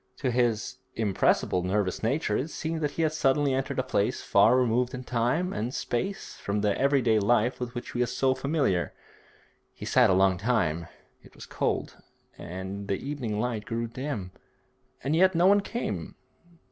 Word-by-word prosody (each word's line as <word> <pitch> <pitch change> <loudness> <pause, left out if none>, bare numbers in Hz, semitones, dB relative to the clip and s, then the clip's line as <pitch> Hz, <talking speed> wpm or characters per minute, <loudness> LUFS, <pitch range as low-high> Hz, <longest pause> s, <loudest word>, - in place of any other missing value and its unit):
To 130 -3 -1
his 120 +1 0 0.2
impressible 100 -3 +1
nervous 95 0 -1
nature 115 -1 0
it 140 +8 -1
seemed 160 0 -4
that 150 - +1
he 165 - +2
had 155 -1 +1
suddenly 140 -2 +2
entered 135 0 -2
a 130 - +1
place 105 -5 0
far 110 +5 +4
removed 125 0 +1
in 125 - -6
time 125 +10 0
and 120 +5 -3
space 195 +12 -3
from 100 +1 -2
the 105 -1 +1
every 140 -1 +2
day 110 -2 +3
life 120 +3 +2
with 125 0 -5
which 120 - -5
he 120 - -4
was 125 - +1
so 135 -1 +3
familiar. 140 - 0 0.8
He - - -8
sat - - +4
a - - +4
long 95 -1 +3
time; 85 -7 0 0.3
it - - -19
was - - -10
cold, - - -2 0.4
and 95 +3 -6
the 100 - +1
evening 125 -5 -4
light 115 -3 -2
grew 115 0 -2
dim, 115 -5 -5 0.7
and 140 +4 +1
yet 185 +2 +4
no 170 +2 +4
one 200 +1 +6
came. 150 - -4
120 Hz, 180 wpm, -27 LUFS, 105-140 Hz, 0.8 s, one